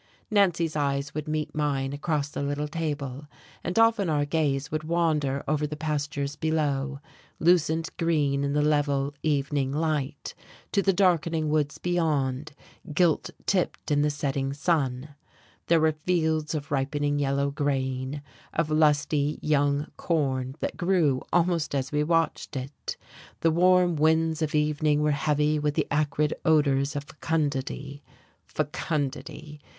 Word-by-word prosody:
Nancy's 175 -6 +2
eyes 140 -1 -1
would 155 0 -4
meet 155 0 -2
mine 140 -3 -1
across 145 -1 -1
the 145 - -5
little 145 +1 -2
table, 145 -3 -4 0.4
and 175 +4 -3
often 225 -5 +4
our 145 -2 +1
gaze 145 -3 0
would 155 0 -2
wander 155 -4 0
over 150 0 +1
the 150 - -5
pastures 145 -2 -2
below, 145 -3 -1 0.4
lucent 165 -1 +2
green 145 -4 +1
in 140 0 0
the 150 0 +2
level 145 -2 +1
evening 140 -2 0
light, 150 -2 -2 0.4
to 200 - +2
the 195 - +3
darkening 170 -4 +2
woods 150 -1 0
beyond, 155 -5 -1 0.4
gilt 165 0 +2 0.2
tipped 180 -4 -1
in 145 0 +3
the 150 - +2
setting 140 -2 -2
sun. 140 -3 0 0.6
There 165 -1 +4
were 160 0 +4
fields 160 -1 0
of 150 -1 -5
ripening 145 +1 0
yellow 140 0 +1
grain, 135 -1 -2 0.3
of 160 -1 0
lusty 150 -1 +2
young 145 -1 +1
corn 135 -5 -1
that - - -3
grew 170 -8 +2
almost 170 -3 +1
as 135 -1 -2
we 150 0 +1
watched 165 -1 0
it: 135 +2 -5 0.4
the 165 - +3
warm 180 +1 +4
winds 160 +1 +2
of 155 -1 -1
evening 150 0 +2
were 150 - +3
heavy 150 +1 +1
with 150 0 -1
the - - +1
acrid 150 0 +1
odours 145 -2 +2
of 145 - -2
fecundity. 145 -2 -3 0.5
Fecundity! 150 0 -3
150 Hz, 140 wpm, -27 LUFS, 140-160 Hz, 0.6 s, often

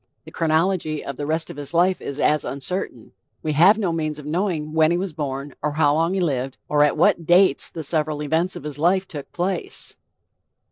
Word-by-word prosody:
The - - -11
chronology 160 -1 0
of 140 - -6
the 145 - -4
rest 160 +1 -1
of - - -11
his 145 +3 -4
life 180 +2 +3
is 140 +1 -6
as 150 0 +2
uncertain...We 140 - -5
have 180 +8 +6
no 195 -6 0
means 155 -2 -2
of 150 - -10
knowing 160 -2 -2
when 160 -1 +4
he 170 - +1
was 185 -2 -3
born, 140 -2 -4
or 150 0 -1
how 145 -1 +3
long 165 +4 +1
he - - 0
lived, 135 -6 -1
or 150 0 +3
at 150 - +2
what 165 -2 +2
dates 185 +2 +4
the 165 - -7
several 150 0 0
events 165 +5 0
of - - -8
his 150 -1 -5
life 185 +4 +2
took 145 -5 -8
place." 180 0 -3
155 Hz, 205 wpm, -22 LUFS, 145-175 Hz, -, have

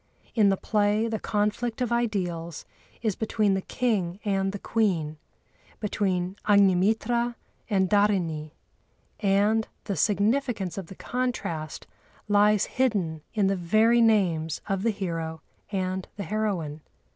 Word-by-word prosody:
In 210 -4 +4
the 195 - +2
play 210 +2 +1
the 220 -1 -2
conflict 215 +3 -1
of 245 -2 -1
ideals 180 -9 -2 0.4
is 215 -4 +1
between 215 -2 +1
the 190 - 0
King 200 -7 -1
and 195 -1 +1
the 205 - -5
Queen, 180 -9 0 0.6
between 190 -3 -1
Agnimitra 210 +5 +3 0.3
and 190 -3 +2
Dhârini, 185 -7 +1 0.7
and 205 +2 +2 0.2
the 200 - -3
significance 210 - +1
of 195 -4 -6
the 190 - -10
contrast 205 - -3 0.4
lies 205 0 +4
hidden 195 -12 0
in 210 -2 +3
the 195 0 +2
very 215 +7 +3
names 175 -9 +2
of 195 -2 -1
the 230 - +2
hero 165 -6 -3 0.3
and 185 -1 -2
the 200 - -3
heroine. 180 -7 -2
200 Hz, 125 wpm, -26 LUFS, 180-220 Hz, 0.7 s, In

